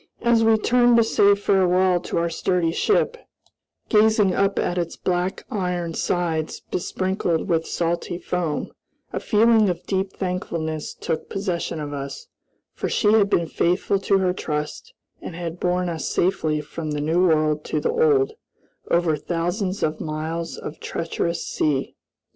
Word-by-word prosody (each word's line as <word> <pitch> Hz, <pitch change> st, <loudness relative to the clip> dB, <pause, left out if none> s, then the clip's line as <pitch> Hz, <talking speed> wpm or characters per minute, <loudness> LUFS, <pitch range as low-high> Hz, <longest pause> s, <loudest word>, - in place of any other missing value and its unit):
As 235 Hz, -1 st, +4 dB
we 225 Hz, 0 st, +5 dB
turned 240 Hz, +2 st, +4 dB
to 230 Hz, -, +6 dB
say 205 Hz, -2 st, +4 dB
farewell 185 Hz, -2 st, +3 dB
to 175 Hz, -, -4 dB
our 170 Hz, 0 st, +1 dB
sturdy 170 Hz, 0 st, 0 dB
ship 435 Hz, -, +1 dB, 0.7 s
gazing 215 Hz, -3 st, +4 dB
up 200 Hz, 0 st, +1 dB
at 175 Hz, 0 st, 0 dB
its 170 Hz, -1 st, -3 dB
black 180 Hz, +1 st, -2 dB
iron 180 Hz, -4 st, -2 dB
sides 160 Hz, -2 st, -1 dB
besprinkled 185 Hz, -2 st, -1 dB
with 165 Hz, -3 st, +1 dB
salty 170 Hz, 0 st, -2 dB
foam 175 Hz, -4 st, -2 dB, 0.4 s
a -, -, -1 dB
feeling 220 Hz, -1 st, +4 dB
of 175 Hz, -, -4 dB
deep 190 Hz, 0 st, -1 dB
thankfulness 165 Hz, -4 st, -3 dB
took 160 Hz, -, -3 dB
possession 180 Hz, -4 st, -2 dB
of 145 Hz, -1 st, -5 dB
us, 140 Hz, -, -6 dB, 0.5 s
for -, -, -3 dB
she 210 Hz, -1 st, +3 dB
had 205 Hz, -2 st, +4 dB
been 170 Hz, -, +2 dB
faithful 180 Hz, +4 st, +1 dB
to 195 Hz, 0 st, +2 dB
her 185 Hz, -1 st, +1 dB
trust, 150 Hz, -4 st, -4 dB, 0.3 s
and 165 Hz, -, -7 dB
had 170 Hz, 0 st, -5 dB
borne 180 Hz, 0 st, 0 dB
us 160 Hz, -5 st, -3 dB
safely 155 Hz, -4 st, +1 dB
from 155 Hz, +1 st, -6 dB
the 150 Hz, -1 st, -2 dB
New 170 Hz, +5 st, +2 dB
World 155 Hz, -2 st, +2 dB
to -, -, -1 dB
the 470 Hz, -, 0 dB
Old, 450 Hz, -3 st, +3 dB, 0.6 s
over 170 Hz, -2 st, +2 dB
thousands 175 Hz, +5 st, -2 dB
of 155 Hz, 0 st, -1 dB
miles 160 Hz, +2 st, -4 dB
of 155 Hz, -, -7 dB
treacherous 170 Hz, 0 st, -3 dB
sea. 140 Hz, -3 st, -1 dB
180 Hz, 155 wpm, -23 LUFS, 165-200 Hz, 0.7 s, to